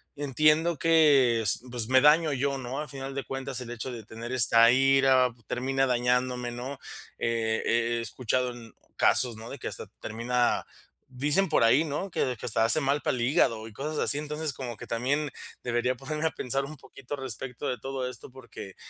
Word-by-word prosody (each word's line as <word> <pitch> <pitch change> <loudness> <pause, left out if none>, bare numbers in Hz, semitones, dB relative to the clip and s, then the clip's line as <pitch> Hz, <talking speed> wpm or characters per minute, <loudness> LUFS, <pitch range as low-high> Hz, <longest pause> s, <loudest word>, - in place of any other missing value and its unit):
entiendo 155 +4 +2
que 145 -7 +4
es 110 +1 +1
pues 120 -2 -4
me 130 0 +6
daño 155 +2 +5
yo, 140 +1 -1
¿no?, 130 +1 -5
a 150 - -4
final 135 0 -7
de 140 - -4
cuentas 135 -1 -4
el 120 -1 -7
hecho 120 +2 -5
de 115 -3 -8
tener 115 +3 -8
esta 115 -2 +6
ira 135 -1 +4 0.2
termina 135 +2 0
dañándome, 125 0 0
¿no?, 125 +3 -6 0.4
he 115 -1 0
he 120 0 +1
he - - -2
escuchado 125 +2 -1
en 115 -2 -13 0.2
casos, 125 -3 +3
¿no?, 110 +1 -10
de - - -8
que - - -6
hasta - - -6
termina 120 +2 -1 0.4
dicen 145 +9 +1
por 150 - +3
ahí, 135 +8 +4
¿no?, 165 +6 -4
que 125 -6 -1
que - - -8
hasta 110 0 +2
hace 135 +7 +5
mal 140 +1 0
para - - 0
el 120 - -3
hígado 115 -3 +1
y - - -15
cosas 150 +5 -5
así. 140 - +3
Entonces, 150 +1 -3
como 125 -3 -6
que - - -10
también 135 +5 -1 0.3
debería 120 +1 0
ponerme 150 +5 -4
a - - -2
pensar 135 0 -2
un 155 +2 -9
poquito 135 0 -9
respecto 130 0 -6
de 125 - -2
todo 135 -1 -4
esto, 125 - -9
porque 120 -6 -11
130 Hz, 195 wpm, -27 LUFS, 120-140 Hz, 0.4 s, me